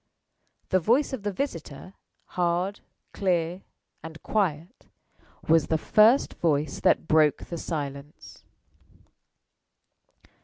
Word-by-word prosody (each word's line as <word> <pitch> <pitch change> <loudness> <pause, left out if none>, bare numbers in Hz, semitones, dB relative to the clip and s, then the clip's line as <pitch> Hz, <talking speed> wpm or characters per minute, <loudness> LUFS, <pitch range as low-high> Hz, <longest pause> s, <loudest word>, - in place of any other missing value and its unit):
The 185 - +3
voice 245 - +1
of 260 - -4
the 205 +1 -2
visitor 185 - -6 0.4
hard, 180 +3 -1 0.3
clear, 180 -1 -1 0.4
and 160 0 -10
quiet 180 - -2 0.6
was 160 -1 +4
the 160 - +1
first 220 - +4
voice 150 -3 0
that - - +2
broke 155 -2 +3
the 170 - -6
silence. 145 -2 -7
170 Hz, 100 wpm, -26 LUFS, 155-200 Hz, 0.6 s, was